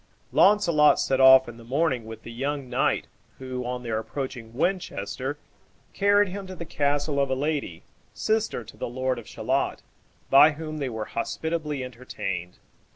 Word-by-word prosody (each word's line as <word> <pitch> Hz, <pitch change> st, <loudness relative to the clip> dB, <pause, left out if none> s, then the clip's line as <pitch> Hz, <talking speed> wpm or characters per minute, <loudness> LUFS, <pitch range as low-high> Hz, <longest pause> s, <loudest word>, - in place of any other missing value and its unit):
Launcelot 170 Hz, -8 st, +5 dB
set 135 Hz, 0 st, +1 dB
off 130 Hz, 0 st, +8 dB
in 120 Hz, -1 st, -9 dB
the 115 Hz, -, -13 dB
morning 130 Hz, -1 st, 0 dB
with 110 Hz, 0 st, -9 dB
the 115 Hz, -, -8 dB
young 135 Hz, +3 st, -3 dB
knight, 125 Hz, +2 st, +1 dB, 0.3 s
who, 130 Hz, -1 st, -5 dB
on 125 Hz, 0 st, -4 dB
their 115 Hz, -2 st, -1 dB
approaching 120 Hz, -1 st, -6 dB
Winchester, 140 Hz, -, -2 dB, 0.6 s
carried 205 Hz, 0 st, +3 dB
him 195 Hz, +1 st, -6 dB
to 185 Hz, -, -8 dB
the 170 Hz, -, -7 dB
castle 145 Hz, -1 st, 0 dB
of 140 Hz, -1 st, +1 dB
a 130 Hz, -, +1 dB
lady, 140 Hz, -, -2 dB, 0.3 s
sister 220 Hz, -, -1 dB
to -, -, -13 dB
the -, -, -4 dB
lord 130 Hz, 0 st, -1 dB
of 115 Hz, -, -12 dB
Shalott, -, -, -1 dB, 0.5 s
by 150 Hz, +3 st, +8 dB
whom 155 Hz, 0 st, -6 dB
they 135 Hz, -3 st, -2 dB
were 110 Hz, -2 st, -4 dB
hospitably 150 Hz, +3 st, -3 dB
entertained. 95 Hz, -8 st, -5 dB
135 Hz, 160 wpm, -26 LUFS, 120-155 Hz, 0.6 s, off